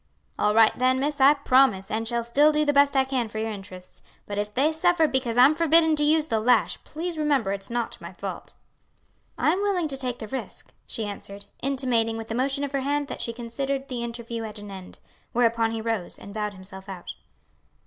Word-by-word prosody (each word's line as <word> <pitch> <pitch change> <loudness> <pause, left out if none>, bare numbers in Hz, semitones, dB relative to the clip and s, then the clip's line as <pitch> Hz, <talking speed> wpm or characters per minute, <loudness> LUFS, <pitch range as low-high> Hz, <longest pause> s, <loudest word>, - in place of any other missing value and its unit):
"All 210 0 +2
right 225 -1 +6
then, 255 +1 +3
miss. 290 +1 -1
I 280 +3 +7
promise, 255 -8 +3
and 225 +1 -2
shall 235 0 -1
still 285 +6 +4
do 300 0 +1
the 290 - +2
best 280 0 +4
I 265 - +5
can 260 -4 -2
for 220 - -7
your 220 0 -2
interests; 190 -3 -10 0.2
but 205 0 -4
if 210 0 -2
they 275 +8 +2
suffer 345 0 +3
because 255 -4 -1
I'm 260 +5 +7
forbidden 320 0 +4
to 295 - +2
use 305 +1 +3
the 225 -8 0
lash, 245 +3 +2
please 330 +1 -5
remember 280 -9 +1
it's 195 0 -4
not 235 -1 -3
my - - -8
fault." - - -7 0.8
"I - - +3
am 370 +4 0
willing 385 -5 +1
to 270 - -2
take 250 -2 -3
the 220 - -7
risk," 265 +4 -5
she 225 - -3
answered, 200 0 -7 0.2
intimating 250 -4 +1
with 225 0 -7
a - - -1
motion 270 +4 0
of 285 - -3
her 275 -1 -1
hand 285 +1 -1
that - - -6
she 230 - -2
considered 265 +4 -4
the 250 -2 -3
interview 235 -1 -5
at 215 -1 -6
an 205 -1 -9
end; 190 -1 -10 0.4
whereupon 230 -1 +2
he 225 0 -3
rose 220 -5 -2
and 200 - -11
bowed 210 -1 -3
himself 190 +1 -11
out. 185 -2 -7
245 Hz, 220 wpm, -25 LUFS, 220-285 Hz, 0.8 s, I